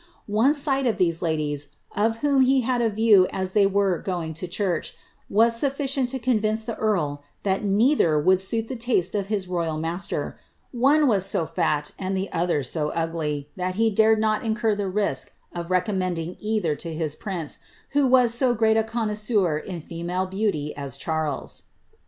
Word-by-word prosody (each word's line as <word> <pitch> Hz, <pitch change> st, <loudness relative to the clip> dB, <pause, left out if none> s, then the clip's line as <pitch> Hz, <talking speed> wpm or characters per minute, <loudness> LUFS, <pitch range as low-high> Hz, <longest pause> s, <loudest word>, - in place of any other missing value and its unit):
One 225 Hz, +8 st, +3 dB
sight 275 Hz, -2 st, +1 dB
of 230 Hz, -, 0 dB
these 170 Hz, -4 st, +1 dB
ladies, 150 Hz, -4 st, -2 dB, 0.2 s
of 225 Hz, +2 st, +1 dB
whom 280 Hz, -2 st, +4 dB
he 260 Hz, +1 st, +4 dB
had 245 Hz, 0 st, 0 dB
a 230 Hz, -, +2 dB
view 210 Hz, -3 st, +5 dB
as 185 Hz, -1 st, -2 dB
they 200 Hz, 0 st, +4 dB
were 195 Hz, -3 st, +1 dB
going 175 Hz, -4 st, -3 dB
to 170 Hz, +4 st, -5 dB
church, 180 Hz, -2 st, -2 dB, 0.3 s
was 230 Hz, +3 st, +4 dB
sulHcient 275 Hz, -2 st, 0 dB
to 265 Hz, +2 st, -3 dB
convince 220 Hz, -3 st, +1 dB
the 230 Hz, -, -3 dB
earl 155 Hz, -10 st, 0 dB, 0.2 s
that 195 Hz, 0 st, 0 dB
neither 205 Hz, -, +3 dB
would 185 Hz, +4 st, +3 dB
suit 225 Hz, +4 st, -2 dB
the 260 Hz, -, -4 dB
taste 230 Hz, -7 st, 0 dB
of 200 Hz, -2 st, -1 dB
his 200 Hz, -3 st, -2 dB
royal 170 Hz, -3 st, -2 dB
master. 165 Hz, +4 st, -3 dB, 0.3 s
One 275 Hz, +5 st, +3 dB
was 200 Hz, -7 st, +2 dB
so 195 Hz, -4 st, 0 dB
fat, 150 Hz, -1 st, -1 dB
and 190 Hz, 0 st, -2 dB
the 190 Hz, +1 st, -3 dB
other 170 Hz, -4 st, 0 dB
so 150 Hz, +4 st, -1 dB
ugly, 155 Hz, -3 st, -2 dB
that 185 Hz, 0 st, -2 dB
he 225 Hz, +1 st, +2 dB
dated 220 Hz, +2 st, +4 dB
not 215 Hz, 0 st, +1 dB
incur 225 Hz, -1 st, +1 dB
the 200 Hz, -1 st, -2 dB
risk 205 Hz, +2 st, -1 dB, 0.2 s
of 170 Hz, 0 st, -5 dB
recommending 185 Hz, -2 st, -1 dB
either 210 Hz, -8 st, 0 dB
to 170 Hz, -, -6 dB
a 160 Hz, -1 st, -2 dB
prince, 180 Hz, -7 st, -5 dB, 0.3 s
who 285 Hz, -1 st, +2 dB
was 250 Hz, -2 st, +4 dB
so 245 Hz, 0 st, +2 dB
grcit 220 Hz, 0 st, +3 dB
a -, -, +2 dB
connoisseur 210 Hz, -6 st, 0 dB
in 175 Hz, 0 st, -7 dB
female 175 Hz, +3 st, -3 dB
beauty 185 Hz, -6 st, -2 dB
as 140 Hz, -3 st, -6 dB
Charles.' 160 Hz, -3 st, -3 dB
195 Hz, 180 wpm, -24 LUFS, 170-225 Hz, 0.3 s, view